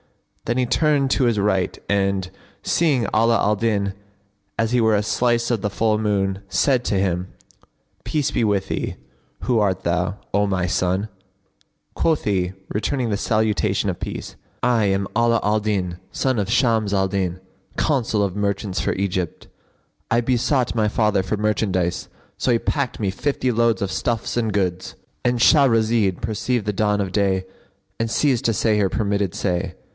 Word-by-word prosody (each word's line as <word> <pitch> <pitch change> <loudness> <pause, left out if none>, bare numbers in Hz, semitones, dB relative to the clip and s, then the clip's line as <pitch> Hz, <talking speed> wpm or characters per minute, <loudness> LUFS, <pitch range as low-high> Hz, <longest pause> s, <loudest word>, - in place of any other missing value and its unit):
Then 120 +2 -1
he 130 - +2
turned 145 0 +2
to 130 - +2
his 120 -3 +2
right 95 -2 0
and, 100 -2 0 0.3
seeing 150 -8 +2
Ala 115 +1 +4
al 105 +1 +2
Din 100 -2 0 0.6
as 115 0 0
he 125 -1 +3
were 110 -1 +3
a 105 - +1
slice 120 +2 +1
of 115 -4 0
the 105 - -1
full 110 +2 +1
moon, 100 -3 0
said 130 +3 +2
to - - 0
him, 90 -2 0 0.8
"Peace 150 -4 -1
be - - 0
with 100 -3 +1
thee! - - -3 0.5
who 120 -3 +1
art 95 -3 0
thou, 90 +3 0 0.2
O 100 +1 +2
my 95 -2 0
son?" 90 +2 0 0.9
Quoth 160 -2 +1
he, 95 -3 0 0.2
returning 120 +2 -1
the - - +1
salutation 105 -2 0
of 90 - -4
peace, - - -6 0.3
"I 120 -4 +3
am 100 0 0
Ala 120 0 +3
al 105 +1 +2
Din, 95 -5 -2
son 130 -2 0
of 100 +1 -2
Shams 115 -5 +2
al 95 -1 +2
Din, 95 -2 -2 0.4
Consul 120 -8 +1
of 100 -3 -1
the 105 - -5
merchants 100 -1 -1
for - - 0
Egypt. 95 -3 -3 0.6
I 115 - +3
besought 125 +1 +1
my 110 -2 +2
father 105 -2 +2
for 105 +3 -2
merchandise; 100 -4 -1 0.3
so 130 - +1
he 115 - +3
packed 140 0 -2
me 100 -3 0
fifty 130 +4 -1
loads 115 -1 +2
of 100 -1 -1
stuffs 115 -2 -2
and 115 -2 0
goods."—And 95 +5 -2
Shahrazed 115 - +4
perceived 110 +1 -1
the 105 - -1
dawn 105 0 +1
of 95 -2 -2
day 95 -2 +1 0.5
and 115 0 -1
ceased 135 -4 +2
to 115 - +3
say 105 0 +1
her 100 -2 +2
permitted 100 -3 -1
say. 90 -3 -2
105 Hz, 170 wpm, -22 LUFS, 95-115 Hz, 0.9 s, Ala